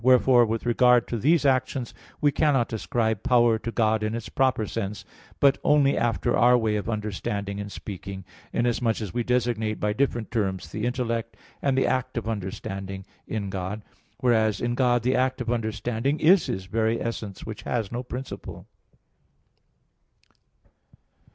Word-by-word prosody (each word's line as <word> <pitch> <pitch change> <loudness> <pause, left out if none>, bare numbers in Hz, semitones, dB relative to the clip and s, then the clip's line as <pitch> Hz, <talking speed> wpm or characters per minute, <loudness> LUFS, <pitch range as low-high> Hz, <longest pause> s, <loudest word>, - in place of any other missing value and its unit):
Wherefore, 125 -1 +5
with 115 +2 -2
regard 120 0 +4
to 120 - -1
these 150 +5 +3
actions 130 -2 +1 0.3
we 145 -1 +3
cannot 135 -7 +1
ascribe 110 -2 -1
power 120 -2 +3
to 115 - -4
God 110 -2 +1
in 110 +1 -1
its 115 -2 -5
proper 130 -4 +1
sense, 105 -1 -4 0.3
but 140 -1 +4
only 145 -2 +4
after 115 -7 +1
our 125 +1 +5
way 110 -2 0
of 105 +2 -3
understanding 100 -2 -3
and 100 0 -6
speaking: 95 -1 -7 0.3
inasmuch 120 -1 0
as 105 -6 -5
we 120 - 0
designate 115 -3 0
by 105 0 0
different 120 -2 -1
terms 95 -5 -2
the 110 +2 -2
intellect 115 -2 -2 0.2
and 135 -2 +1
the 135 - +3
act 130 -1 -1
of 115 - -3
understanding 95 -2 -5 0.2
in 100 -3 -3
God, 95 +3 -4 0.4
whereas 110 -4 +2
in 120 0 -1
God 120 -2 +2
the 125 +2 +2
act 130 +1 +1
of 120 -1 -2
understanding 115 +4 -1
is 175 +4 +5
His 95 0 -3
very 110 +3 0
essence 110 -4 -5
which 110 -1 -7
has 115 -5 -2
no 120 +1 -3
principle. 130 +1 -7
115 Hz, 155 wpm, -25 LUFS, 105-125 Hz, 0.4 s, Wherefore